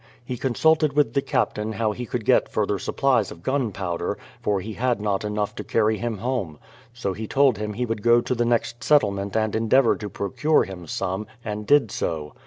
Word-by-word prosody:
He 125 - -4
consulted 150 +4 +2
with 140 -5 +2
the 140 - +2
Captain 110 -4 -1
how 110 0 0
he 120 +3 -6
could 115 -2 -3
get - - +3
further - - 0
supplies - - +1
of 85 - -11
gun 130 -2 0
powder, 90 -3 -3 0.2
for 105 -2 +1
he 110 +4 -6
had 125 0 0
not 105 -1 -1
enough 105 0 -2
to - - -4
carry 110 -1 +1
him 120 -2 -2
home; 105 - -3 0.3
so 115 -5 -3
he 110 +3 -6
told 135 -4 +3
him 105 0 -3
he 125 +4 -2
would 115 -2 -3
go 120 +2 +5
to 120 - -2
the 120 -1 0
next 120 +1 0
settlement 100 -9 +2
and 110 -1 0
endeavour 115 +3 +4
to 105 - -6
procure 150 +12 +1
him 90 -3 -8
some, 95 +5 -3 0.2
and 105 0 -4
did 145 -7 +4
so. 75 -3 -3
110 Hz, 205 wpm, -24 LUFS, 100-125 Hz, 0.3 s, go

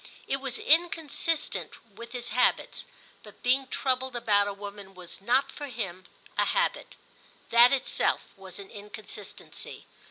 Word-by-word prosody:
It 275 - 0
was 270 -2 -2
inconsistent 325 -1 +1 0.2
with 235 +3 -9
his 245 -1 -4
habits; 250 - +1 0.3
but - - -15
being 265 +2 +3
troubled 260 -1 0
about 205 -4 +3
a - - -1
woman 200 -1 -9
was 180 +1 -10
not, 250 +6 +3
for 290 - -6
him, 185 -8 -5 0.3
a - - +5
habit: - - 0 0.6
that 235 +1 +9
itself 270 -2 +1
was 190 -2 -10
an 200 -1 -10
inconsistency. 210 -1 -8
235 Hz, 135 wpm, -29 LUFS, 200-265 Hz, 0.6 s, that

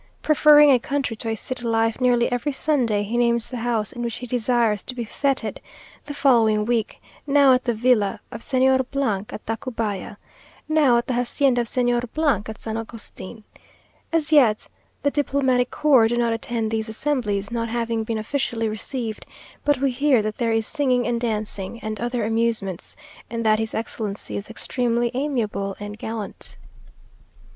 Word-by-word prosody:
Preferring 295 -1 +7
a 255 - +5
country 275 -2 -2
to 225 - -3
a 225 - -1
city 250 +3 -5
life, 225 +1 0
nearly 245 -1 +3
every 245 +4 -1
Sunday 255 -8 +1
he 225 +4 -3
names 235 -1 +1
the 250 -1 -5
house 225 -3 -1
in 240 - -6
which 235 -1 -3
he 250 - -7
desires 235 -3 +1
to 255 - -6
be 240 -2 -3
fêted 275 +4 -1 0.5
the 290 - -6
following 225 -7 +3
week 230 -2 -1 0.3
now 280 -2 +6
at 255 0 +1
the 240 - +1
villa 215 -3 +2
of 230 - -7
Señor 260 0 +3
at 240 -7 -2
Tacubaya 225 -4 -4 0.5
now 300 -6 +4
at 235 - 0
the 255 - -2
hacienda 245 +1 +2
of 235 - -4
Señor 240 0 +1 0.5
at 220 - -6
San 220 0 -5
Agustin. 225 -1 -9 0.7
As 320 -2 0
yet 245 -9 +4 0.4
the 285 - +2
diplomatic 265 -4 +1
corps 270 -7 +4
do 240 +1 -1
not 235 -1 +2
attend 225 -1 -2
these 220 0 -1
assemblies, 220 -5 -1
not 230 -1 -2
having 230 -1 -1
been 225 0 -3
officially 230 0 -1
received; 220 +1 -4 0.4
but 290 -2 +2
we 275 +1 +1
hear 260 -3 +3
that 215 0 -4
there 230 -2 +1
is 225 -1 +1
singing 255 -4 +1
and 235 -1 -1
dancing, 215 -2 -3
and 215 0 -4
other 240 -2 -1
amusements, 225 -5 -1 0.3
and 230 0 -3
that 215 0 +4
his 220 0 -3
excellency 215 -2 -4
is 200 - -5
extremely 235 0 -1
amiable 230 -8 -2
and 205 +1 -7
galant. 220 -3 -6
235 Hz, 170 wpm, -23 LUFS, 220-255 Hz, 0.7 s, Preferring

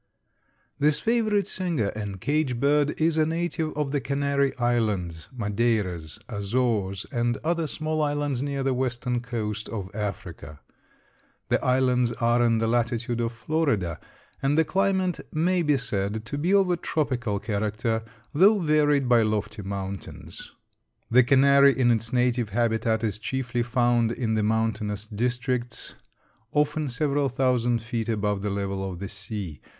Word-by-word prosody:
This 150 +1 +3
favorite 215 -1 +1
singer 170 - -1
and 100 -3 -5
cage 145 -1 0
bird 145 +2 +2
is 160 0 +2
a 155 - +4
native 165 -1 -1
of 150 -2 -1
the 145 -1 0
Canary 140 0 0
Islands, 105 -10 -1
Madeiras, 105 -8 -1
Azores 100 -3 -1
and 120 -1 0
other 165 0 0
small 155 +1 -2
islands 145 -3 -1
near 140 -1 -2
the 135 -1 +1
western 125 -1 -1
coast 110 -4 -4
of 95 -4 -5
Africa. 95 -7 -6 0.9
The - - +1
islands 125 -2 +2
are 120 +1 +2
in 115 -1 +3
the 115 - 0
latitude 120 +1 0
of 115 0 -1
Florida 115 - -1 0.4
and 140 +2 +1
the 160 - +4
climate 190 0 +1
may 175 +3 +1
be 150 -3 +2
said 110 -3 -2
to 145 - -5
be 160 +6 0
of 195 -2 +4
a 175 - +1
tropical 130 -10 -1
character, 110 +2 -1 0.3
though 200 +8 +6
varied 150 -5 +2
by 120 -2 +5
lofty 110 0 -1
mountains. 100 0 -7 0.6
The 125 +2 +7
canary 140 +2 +5
in 120 -2 +4
its 115 0 0
native 125 -2 +1
habitat 115 +1 0
is 110 -1 -1
chiefly 125 +1 -2
found 120 -1 +2
in 115 -2 -1
the 110 - +1
mountainous 110 -1 -1
districts, 120 +2 -3 0.6
often 150 0 +1
several 140 +2 0
thousand 120 -3 +1
feet 115 -1 -3
above 105 -2 0
the 105 - -2
level 100 -1 -2
of 90 - -7
the 100 +3 -5
sea. 95 - -7
120 Hz, 145 wpm, -26 LUFS, 110-145 Hz, 0.9 s, The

